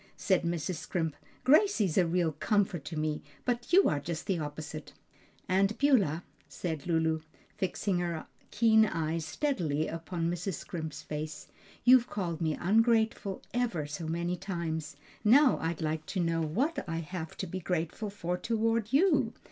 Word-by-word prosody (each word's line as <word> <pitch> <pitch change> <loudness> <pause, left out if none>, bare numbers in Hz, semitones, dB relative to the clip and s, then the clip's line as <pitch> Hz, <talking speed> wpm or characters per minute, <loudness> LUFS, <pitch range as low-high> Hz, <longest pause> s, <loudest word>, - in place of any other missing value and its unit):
said 190 -2 +2
Mrs. 170 0 -2
Scrimp. 160 -1 -2 0.3
"Gracie's 270 - +4
a 180 -3 +4
real 170 -1 +1
comfort 195 -1 0
to 155 - -5
me, 155 0 -1 0.2
but 240 -1 -1
you 385 +3 +7
are 145 - +1
just 160 +2 -5
the 190 -4 0
opposite." 150 0 -6 0.5
"Aunt 195 +3 +2
Beulah," 200 - +3 0.3
said 160 -3 -4
Lulu, 160 -1 +1 0.4
fixing 190 0 0
her 170 -2 -2 0.2
keen 220 0 +5
eyes 165 -2 -2
steadily 160 - 0
upon 165 +1 -3
Mrs. 175 +1 -2
Scrimp's 155 -1 -6
face, 155 0 -6 0.3
"you've 250 -1 +6
called 175 -5 -3
me 160 -2 0
ungrateful 220 0 +2
ever 230 -11 0
so 150 +2 -5
many 170 +2 -1
times. 165 -5 -4 0.3
Now 260 +5 +6
I'd 165 0 -2
like 155 0 -2
to 190 - -2
know 165 -1 +1
what 235 - 0
I 165 - -2
have 165 0 -5
to - - -3
be 185 +1 -5
grateful 180 +4 -2
for 180 -3 -3
toward 225 -1 0
you? 350 +8 +3
175 Hz, 155 wpm, -30 LUFS, 160-210 Hz, 0.5 s, you